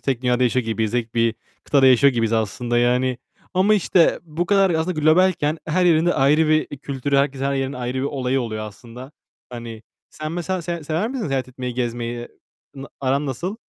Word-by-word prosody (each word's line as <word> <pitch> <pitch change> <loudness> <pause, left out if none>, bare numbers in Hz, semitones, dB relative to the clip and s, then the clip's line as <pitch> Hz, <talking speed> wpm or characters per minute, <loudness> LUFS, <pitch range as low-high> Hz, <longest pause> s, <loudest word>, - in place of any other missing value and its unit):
tek 130 -2 -2
dünyada 125 0 +1
yaşıyor 125 0 +1
gibiyiz, 110 -1 -1
tek 120 -2 -2
bir 115 -1 +2 0.3
kıtada 135 -2 +4
yaşıyor 130 +2 +6
gibiyiz 115 -1 0
aslında 120 +2 0
yani. 125 +1 +1 0.4
Ama 195 +3 +4
işte 185 -4 +3
bu 170 +1 -3
kadar 195 -2 +3
aslında 160 0 -1
globalken, 155 -1 +3
her 175 +3 +1
yerinde 170 0 +3
ayrı 150 +3 +3
bir 155 0 +3
kültürü, 140 0 -2
herkesin, 140 -1 0
her 140 - 0
yerin 135 0 -2
ayrı 125 0 -4
bir - - -2
olayı 135 -2 -1
oluyor 110 -2 -4
aslında. 120 +6 -12 0.4
Hani 115 -2 -8 0.3
sen 155 +1 -6
mesela 175 +1 -3
se 170 -1 -4
sever 165 +9 -1
misin 255 -5 -3
seyahat 130 -2 -2
etmeyi, 125 -1 -6
gezmeyi? 120 -1 -3 0.5
N 135 0 -8
aran 140 +2 0
nasıl? 170 - -4
135 Hz, 185 wpm, -21 LUFS, 120-160 Hz, 0.5 s, yaşıyor